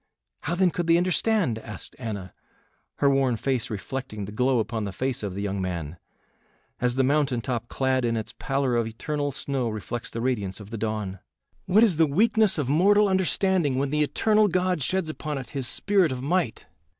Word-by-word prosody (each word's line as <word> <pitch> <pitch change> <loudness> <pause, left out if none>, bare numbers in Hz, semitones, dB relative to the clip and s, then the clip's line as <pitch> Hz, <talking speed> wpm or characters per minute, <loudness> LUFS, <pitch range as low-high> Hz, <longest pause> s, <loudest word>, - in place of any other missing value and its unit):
"How, 165 +5 -2
then, 180 0 +3
could 175 0 -2
they 165 0 +5
understand?" 180 - +1
asked - - -8
Anna, 100 -7 -5 0.6
her 140 - +2
worn 135 -4 +3
face 125 -1 -1
reflecting 110 0 -5
the 100 - -8
glow 125 +4 +2
upon 110 0 -1
the 100 - -3
face 130 +5 -2
of 100 -3 -4
the 100 - -3
young 100 -1 -2
man, 85 -3 -4 0.8
as 125 0 +1
the 135 - +3
mountain 140 -2 +2
top 120 -1 -3
clad 130 0 0
in 115 -1 +1
its 110 - -5
pallor 135 -2 0
of 115 -1 +1
eternal 145 +5 -3
snow 135 -2 -2
reflects 110 +2 -5
the 115 - -5
radiance 115 -6 -1
of 105 0 -11
the 115 - -4
dawn. 105 -3 -3 0.5
"What 200 +5 +5
is 195 -9 +3
the 160 -1 +5
weakness 215 +5 +3
of 145 -5 -1
mortal 200 +8 +4
understanding 190 -5 +1
when 135 +1 0
the 150 0 +1
eternal 215 +8 +3
God 185 -2 0
sheds 185 +5 0
upon 155 -1 -4
it 130 -4 -7
his 135 -4 -3
spirit 195 -2 +2
of 130 0 -4
might? 165 -5 0
135 Hz, 195 wpm, -26 LUFS, 115-170 Hz, 0.8 s, they